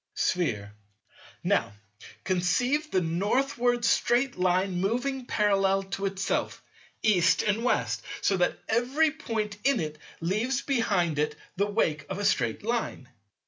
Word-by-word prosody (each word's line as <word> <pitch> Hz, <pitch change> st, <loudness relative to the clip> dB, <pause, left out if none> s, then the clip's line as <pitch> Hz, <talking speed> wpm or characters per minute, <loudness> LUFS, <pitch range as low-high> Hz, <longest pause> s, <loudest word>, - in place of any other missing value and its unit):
Sphere. 105 Hz, -, -1 dB, 0.7 s
Now -, -, +1 dB, 0.5 s
conceive 245 Hz, -, +1 dB
the 185 Hz, -, +1 dB
Northward 240 Hz, +8 st, +1 dB
straight 245 Hz, +3 st, +2 dB
Line 180 Hz, 0 st, +1 dB
moving 250 Hz, +5 st, -1 dB
parallel 195 Hz, -2 st, +2 dB
to 195 Hz, 0 st, -1 dB
itself, 195 Hz, -1 st, -2 dB, 0.4 s
East 185 Hz, -4 st, +4 dB
and 215 Hz, +2 st, 0 dB
West, 250 Hz, -, 0 dB, 0.2 s
so 195 Hz, -, +2 dB
that 180 Hz, -, +1 dB
every 260 Hz, +8 st, +2 dB
point 215 Hz, -5 st, -3 dB
in 275 Hz, -3 st, +3 dB
it 155 Hz, -2 st, -4 dB, 0.2 s
leaves 220 Hz, +10 st, -1 dB
behind 195 Hz, -, +1 dB
it 150 Hz, 0 st, 0 dB, 0.2 s
the 200 Hz, +2 st, +1 dB
wake 155 Hz, -9 st, 0 dB
of 190 Hz, -, -3 dB
a 205 Hz, -, -2 dB
straight 200 Hz, -, +1 dB
Line. 225 Hz, -, -2 dB
205 Hz, 130 wpm, -27 LUFS, 180-240 Hz, 0.7 s, East